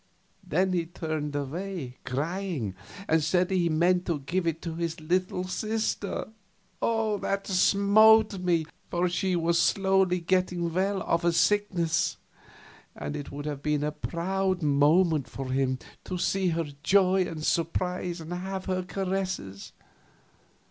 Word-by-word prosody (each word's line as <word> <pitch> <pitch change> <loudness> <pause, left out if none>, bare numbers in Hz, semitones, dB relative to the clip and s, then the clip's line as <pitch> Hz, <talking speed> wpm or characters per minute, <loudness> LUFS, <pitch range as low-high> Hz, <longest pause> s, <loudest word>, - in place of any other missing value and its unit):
Then 185 +4 +1
he 170 -2 0
turned 155 -4 -4
away, 145 -1 -4
crying, 150 - -2 0.3
and 160 -1 +3
said 180 +4 +1
he 185 -2 +2
had 165 - +1
meant 180 +3 +2
to 170 -3 0
give 170 +6 -2
it 165 -1 -1
to 165 - -4
his 165 0 -3
little 180 +3 0
sister. 215 +2 -2 0.5
That 215 -3 0
smote 205 +2 +5
me, 175 -3 +1 0.2
for 175 +1 +1
she 180 +1 0
was 170 0 +2
slowly 190 -2 +2
getting 175 -1 0
well 190 +2 0
of 170 +1 0
a 170 - +3
sickness, 175 -3 +1 0.8
and 145 - -5
it 145 -2 -6
would 145 +1 -6
have 145 -2 -4
been 150 0 0
a 150 - 0
proud 185 +3 -2
moment 150 +1 +3
for 135 -1 -6
him, 130 -1 +1 0.3
to 185 - -3
see 190 +1 +1
her 165 -1 0 0.2
joy 190 +1 +3
and 155 -2 -6
surprise 175 +1 -1
and 165 +2 -6
have 190 +1 -4
her 185 -1 -1
caresses. 185 - -3
175 Hz, 140 wpm, -27 LUFS, 155-190 Hz, 0.8 s, smote